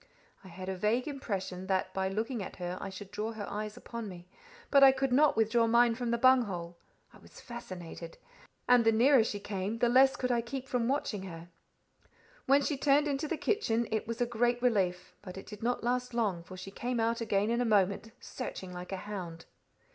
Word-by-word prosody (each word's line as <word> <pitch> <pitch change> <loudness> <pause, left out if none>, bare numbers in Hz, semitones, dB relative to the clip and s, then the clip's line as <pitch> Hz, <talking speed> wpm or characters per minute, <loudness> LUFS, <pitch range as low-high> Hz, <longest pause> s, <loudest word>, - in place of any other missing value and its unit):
I - - -12
had 185 +1 -9
a 190 - -2
vague 220 +8 0
impression 195 -9 -4
that 185 -1 0
by 190 0 -1
looking 220 +4 -2
at 190 - -7
her 180 0 -4
I - - -4
should 190 +1 -9
draw 215 +2 -3
her 210 -2 -6
eyes 210 +1 -5
upon 230 -3 -6
me; 175 -1 -11 0.4
but 280 - +6
I 270 - +10
could 265 -1 -1
not 290 0 +4
withdraw 225 +1 +3
mine 235 +1 +4
from 240 0 -3
the 235 - +1
bung 255 +1 +6
hole. 175 -3 -6 0.4
I - - -16
was - - -16
fascinated; 180 -8 -8 0.5
and 245 -1 +6
the 225 - +5
nearer 245 +2 +5
she 205 -2 -3
came, 200 +2 -3
the 240 +1 +2
less 265 +2 +5
could 250 -1 -1
I 240 -1 +2
keep 260 +3 -6
from 245 -3 0
watching 250 -7 -1
her. 170 -2 -9 1.0
When 280 +2 +5
she 285 0 -1
turned 285 +2 +3
into 285 +1 -1
the 325 - -2
kitchen, 235 - 0
it 220 -1 -1
was 230 0 -4
a 245 - +2
great 240 +1 +1
relief; 190 -7 0
but 185 -2 -9
it 195 - -8
did 210 -1 -10
not 245 +1 -1
last 250 0 -1
long, 205 -7 0
for 185 +2 -11
she 190 +1 -8
came 245 +3 -3
out 230 +1 0
again 210 -1 +1
in 235 +1 +1
a - - +3
moment, 205 -1 +1
searching 190 -7 -7
like 180 +1 -8
a 195 - -2
hound. 180 -5 -6
225 Hz, 215 wpm, -31 LUFS, 190-245 Hz, 1.0 s, I